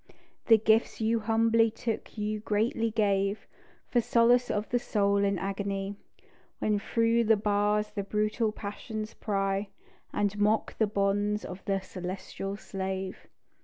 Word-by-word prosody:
The 225 Hz, -, +8 dB
gifts 220 Hz, +1 st, +2 dB
you 225 Hz, +1 st, +2 dB
humbly 225 Hz, +1 st, +3 dB
took 225 Hz, 0 st, -5 dB
you 215 Hz, 0 st, -2 dB
greatly 220 Hz, +2 st, 0 dB
gave, 200 Hz, -2 st, +1 dB, 0.5 s
For 240 Hz, -, +4 dB
solace 240 Hz, +2 st, +4 dB
of 210 Hz, +1 st, -1 dB
the 245 Hz, -, +1 dB
soul 200 Hz, -3 st, +1 dB
in 200 Hz, -1 st, +2 dB
agony, 195 Hz, +1 st, -3 dB, 0.6 s
When 210 Hz, -1 st, +1 dB
through 230 Hz, +2 st, +2 dB
the 220 Hz, 0 st, +5 dB
bars 210 Hz, +1 st, +1 dB
the 200 Hz, -, -3 dB
brutal 215 Hz, +2 st, 0 dB
passions 215 Hz, +1 st, -6 dB
pry, 195 Hz, -1 st, -1 dB, 0.4 s
And 205 Hz, 0 st, -1 dB
mock 210 Hz, +2 st, +1 dB
the 220 Hz, -, +4 dB
bonds 205 Hz, +1 st, 0 dB
of 185 Hz, +1 st, -8 dB
the 195 Hz, -1 st, 0 dB
celestial 190 Hz, +2 st, -6 dB
slave. 190 Hz, -1 st, -5 dB
210 Hz, 135 wpm, -29 LUFS, 200-225 Hz, 0.6 s, The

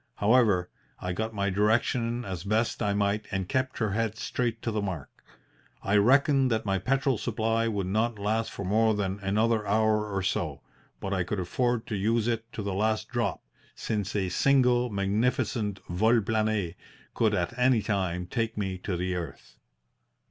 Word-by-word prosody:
However, 105 Hz, -5 st, +3 dB, 0.3 s
I 90 Hz, 0 st, -3 dB
got 110 Hz, +4 st, -2 dB
my 100 Hz, -2 st, -1 dB
direction 115 Hz, +4 st, +1 dB
as 95 Hz, -3 st, -5 dB
best 110 Hz, +3 st, 0 dB
I 105 Hz, -, +1 dB
might 100 Hz, +1 st, 0 dB
and 95 Hz, -2 st, -2 dB
kept 130 Hz, +3 st, -1 dB
her 110 Hz, -3 st, 0 dB
head 110 Hz, +1 st, -1 dB
straight 115 Hz, 0 st, -2 dB
to 115 Hz, -, -1 dB
the 105 Hz, -1 st, -1 dB
mark. 90 Hz, -8 st, -4 dB, 0.7 s
I 100 Hz, -, +1 dB
reckoned 135 Hz, +4 st, +4 dB
that 110 Hz, -2 st, 0 dB
my 95 Hz, -1 st, +1 dB
petrol 135 Hz, +1 st, +1 dB
supply 115 Hz, 0 st, 0 dB
would 100 Hz, -4 st, -1 dB
not 110 Hz, +4 st, 0 dB
last 110 Hz, +3 st, -1 dB
for 100 Hz, -, -6 dB
more 110 Hz, +3 st, +3 dB
than 100 Hz, -1 st, -2 dB
another 105 Hz, +3 st, +1 dB
hour 105 Hz, 0 st, +2 dB
or 95 Hz, -1 st, -1 dB
so, 90 Hz, -, -2 dB, 0.4 s
but 95 Hz, -, -3 dB
I 95 Hz, -2 st, +1 dB
could 95 Hz, +3 st, -3 dB
afford 120 Hz, +6 st, 0 dB
to 110 Hz, -, -3 dB
use 110 Hz, +3 st, +1 dB
it 115 Hz, 0 st, -2 dB
to 105 Hz, -, -4 dB
the 100 Hz, -1 st, -2 dB
last 110 Hz, +2 st, 0 dB
drop, -, -, -2 dB, 0.3 s
since 105 Hz, -1 st, -3 dB
a 95 Hz, -3 st, 0 dB
single 125 Hz, +3 st, +3 dB
magnificent 105 Hz, +1 st, 0 dB
vol 110 Hz, +7 st, +3 dB
plane 110 Hz, -4 st, 0 dB, 0.4 s
could -, -, +2 dB
at -, -, -1 dB
any 125 Hz, -3 st, +3 dB
time 90 Hz, -4 st, -1 dB
take 115 Hz, +4 st, -2 dB
me 95 Hz, -3 st, -2 dB
to 90 Hz, -1 st, -3 dB
the 90 Hz, +1 st, -1 dB
earth. 85 Hz, -5 st, -7 dB
105 Hz, 175 wpm, -28 LUFS, 100-115 Hz, 0.7 s, reckoned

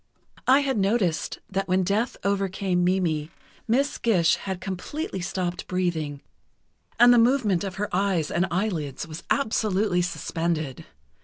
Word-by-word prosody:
I 265 Hz, +3 st, +6 dB
had 265 Hz, -5 st, 0 dB
noticed 195 Hz, -5 st, 0 dB
that 195 Hz, +1 st, -1 dB
when 185 Hz, 0 st, +2 dB
death 210 Hz, +6 st, 0 dB
overcame 195 Hz, -2 st, 0 dB
Mimi, 170 Hz, -4 st, +1 dB, 0.4 s
Miss 270 Hz, +5 st, +1 dB
Gish 180 Hz, -8 st, +3 dB
had 190 Hz, -2 st, -5 dB
completely 195 Hz, -, -4 dB
stopped 180 Hz, -1 st, -3 dB
breathing 160 Hz, -6 st, -2 dB, 0.8 s
and 245 Hz, +1 st, +8 dB
the 240 Hz, -, +6 dB
movement 230 Hz, -7 st, +3 dB
of 190 Hz, -2 st, -4 dB
her 205 Hz, +2 st, -2 dB
eyes 185 Hz, -5 st, +1 dB
and 180 Hz, +2 st, +1 dB
eyelids 170 Hz, -8 st, -2 dB
was 160 Hz, +1 st, -7 dB
absolutely 210 Hz, -7 st, +1 dB
suspended. 165 Hz, -5 st, -3 dB
190 Hz, 135 wpm, -25 LUFS, 175-210 Hz, 0.8 s, and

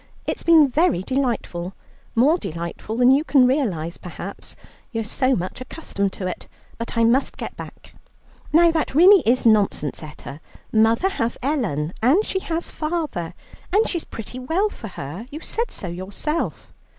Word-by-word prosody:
It's -, -, -2 dB
been 320 Hz, -3 st, +6 dB
very 265 Hz, -, +2 dB
delightful, 230 Hz, -8 st, -2 dB, 0.4 s
more 290 Hz, +9 st, +4 dB
delightful 170 Hz, -, -5 dB
than 250 Hz, +1 st, +6 dB
you 280 Hz, +3 st, +4 dB
can 270 Hz, -4 st, +5 dB
realize, 200 Hz, -, 0 dB
perhaps 180 Hz, +3 st, -8 dB, 0.4 s
you're 225 Hz, -2 st, -2 dB
so 255 Hz, +5 st, +1 dB
much 185 Hz, +7 st, -4 dB
accustomed 200 Hz, -8 st, -3 dB
to 190 Hz, -, -5 dB
it; 185 Hz, -, -5 dB, 0.3 s
but 230 Hz, 0 st, -5 dB
I 230 Hz, -, +4 dB
must 240 Hz, +4 st, +2 dB
get -, -, -6 dB
back." -, -, -11 dB, 0.6 s
"Now, 335 Hz, +2 st, +6 dB
that 320 Hz, -4 st, -1 dB
really 370 Hz, +4 st, +8 dB
is 250 Hz, +2 st, +3 dB
nonsense, 205 Hz, -, +2 dB
Etta. 150 Hz, -2 st, -9 dB, 0.3 s
Mother 225 Hz, -, +3 dB
has 235 Hz, -11 st, -2 dB
Ellen, 190 Hz, -, -1 dB
and 300 Hz, -, +4 dB
she 380 Hz, -, -1 dB
has 335 Hz, -2 st, -3 dB
father, 305 Hz, -, -3 dB, 0.4 s
and 420 Hz, +4 st, +3 dB
she 345 Hz, -, -1 dB
is -, -, -9 dB
pretty 230 Hz, +3 st, -8 dB
well 330 Hz, +11 st, 0 dB
for 230 Hz, -, -9 dB
her; 180 Hz, -, -7 dB
you 300 Hz, +2 st, -7 dB
said 465 Hz, +6 st, -1 dB
so 190 Hz, -, -7 dB
yourself." 195 Hz, -, -4 dB
245 Hz, 160 wpm, -22 LUFS, 190-310 Hz, 0.6 s, really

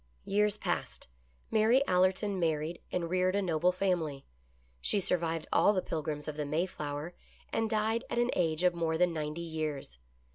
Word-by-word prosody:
Years 210 Hz, +1 st, +2 dB
passed. -, -, -3 dB, 0.4 s
Mary 225 Hz, +5 st, +4 dB
Allerton 185 Hz, +2 st, +2 dB
married 160 Hz, 0 st, -1 dB
and 175 Hz, -2 st, -1 dB
reared 185 Hz, +2 st, +1 dB
a 200 Hz, -, +2 dB
noble 175 Hz, 0 st, +2 dB
family. 175 Hz, -7 st, -1 dB, 0.6 s
She 205 Hz, -, +1 dB
survived 165 Hz, -3 st, 0 dB
all 205 Hz, -, +5 dB
the 185 Hz, -, +1 dB
Pilgrims 150 Hz, -2 st, -3 dB
of 155 Hz, -1 st, -4 dB
the 150 Hz, -, -1 dB
May 160 Hz, +5 st, +1 dB
flower 150 Hz, -1 st, -5 dB, 0.4 s
and 225 Hz, -1 st, +1 dB
died 220 Hz, +1 st, +1 dB
at -, -, -2 dB
an 240 Hz, +1 st, +2 dB
age 165 Hz, -1 st, +1 dB
of 180 Hz, -1 st, +4 dB
more 165 Hz, -1 st, 0 dB
than 175 Hz, 0 st, +3 dB
ninety 155 Hz, +1 st, -3 dB
years. 155 Hz, -, -4 dB
175 Hz, 170 wpm, -31 LUFS, 155-195 Hz, 0.6 s, all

